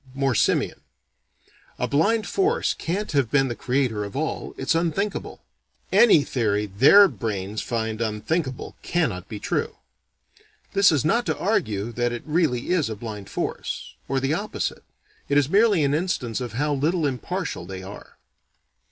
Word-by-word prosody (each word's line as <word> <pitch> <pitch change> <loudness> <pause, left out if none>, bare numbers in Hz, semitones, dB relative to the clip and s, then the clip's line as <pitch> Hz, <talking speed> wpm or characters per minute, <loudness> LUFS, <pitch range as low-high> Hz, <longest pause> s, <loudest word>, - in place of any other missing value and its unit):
(More 135 -1 +1
simian.) - - +1 1.0
"A - - -1
blind 205 +10 +2
force 400 +5 +1
can't 195 +6 -3
have 140 -6 +1
been 135 0 +2
the 120 - -3
creator 125 -5 0
of 100 +3 -7
all. 155 +3 -3
It's 135 +3 0
unthinkable." 175 +5 -2 0.5
Any 205 -11 +6
theory 105 -6 0
their 135 - +7
brains 105 - -4
find 110 -2 -3
"unthinkable" 125 +6 -2
cannot 150 - -1
be 105 - -6
true. - - -2 1.0
(This 200 -1 +5
is 150 -2 +1
not 235 +9 +2
to - - 0
argue 115 - -1
that 120 +1 -1
it 120 - -5
really 150 -6 0
is 170 -9 +2
a 110 - -4
blind 105 -2 -7
force - - -4
or 135 0 0
the 135 +3 0
opposite. 205 +6 -3 0.5
It 140 - +3
is 145 -1 +3
merely 200 -3 +4
an 140 0 +2
instance 145 -8 -1
of 120 -3 -5
how 145 +5 0
little 155 +4 +1
impartial 145 - -3
they 95 0 -7
are.) 100 +2 -11
135 Hz, 155 wpm, -24 LUFS, 110-170 Hz, 1.0 s, their